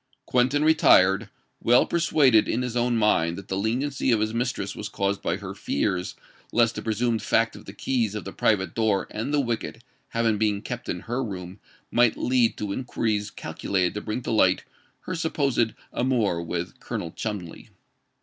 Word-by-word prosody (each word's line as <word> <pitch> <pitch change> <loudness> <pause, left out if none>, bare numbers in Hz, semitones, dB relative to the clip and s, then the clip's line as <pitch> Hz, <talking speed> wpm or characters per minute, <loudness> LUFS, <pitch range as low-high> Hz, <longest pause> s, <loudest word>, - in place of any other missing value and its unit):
Quentin 130 +4 +2
retired, 105 -10 +5 0.3
well 120 +1 +5
persuaded 145 -9 +3
in 125 - 0
his 125 -1 -4
own 120 0 +1
mind 85 -6 +2
that 100 - -10
the 95 - -1
leniency 130 +7 0
of 115 - +3
his 110 +1 -1
mistress 125 +2 -2
was - - -5
caused 100 0 -1
by - - 0
her - - -7
fears 90 +4 -2 0.4
lest 115 -1 +3
the - - -5
presumed 115 +1 0
fact 115 0 +1
of - - -12
the - - -8
keys 115 0 -1
of 105 - -4
the 95 - -7
private 100 -4 +1
door 110 -4 +1
and 115 +6 -3
the 150 - +2
wicket 120 -2 -3 0.3
having 115 -2 +1
been 105 -2 +1
kept 125 0 -6
in 90 - -3
her 120 +3 -2
room 95 -3 -7 0.3
might 120 -1 +3
lead 125 -2 +2
to 105 -2 -3
inquiries 110 -4 -1
calculated 95 -3 -2
to 105 - -4
bring 110 +4 -4
to - - -3
light 95 -4 +3 0.4
her 185 - -5
supposed 140 -9 0 0.2
amour 115 -9 +1
with 85 +1 -4
Colonel 85 - -5
Cholmondeley. 100 -6 -6
110 Hz, 180 wpm, -25 LUFS, 100-125 Hz, 0.4 s, retired